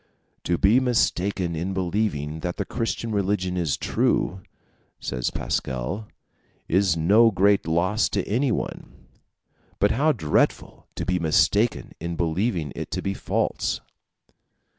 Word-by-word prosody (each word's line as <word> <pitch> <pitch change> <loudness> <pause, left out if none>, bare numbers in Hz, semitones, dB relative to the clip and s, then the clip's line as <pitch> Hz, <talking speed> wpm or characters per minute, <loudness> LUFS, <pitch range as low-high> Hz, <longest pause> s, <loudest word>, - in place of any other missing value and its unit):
"To 85 - +1
be 105 +6 +5
mistaken 100 -8 0
in 90 +4 -3
believing 90 -5 -1
that 90 +2 -4
the - - -2
Christian 115 -1 -3
religion 100 -3 0
is 85 -6 0
true," 95 +3 0 0.6
says 60 -2 -2
Pascal, 65 - -3 0.6
"is 95 -1 +2
no 105 +8 +5
great 100 -3 +2
loss 90 +7 +1
to 100 - -2
anyone; 125 +3 -2 0.8
but 100 - +3
how 150 +6 +3
dreadful 75 - 0
to - - -3
be 90 0 0
mistaken 85 +8 +2
in 85 +1 -4
believing 85 - -1
it - - -5
to - - -3
be 100 - -1
false!" - - -1
95 Hz, 125 wpm, -24 LUFS, 85-105 Hz, 0.8 s, be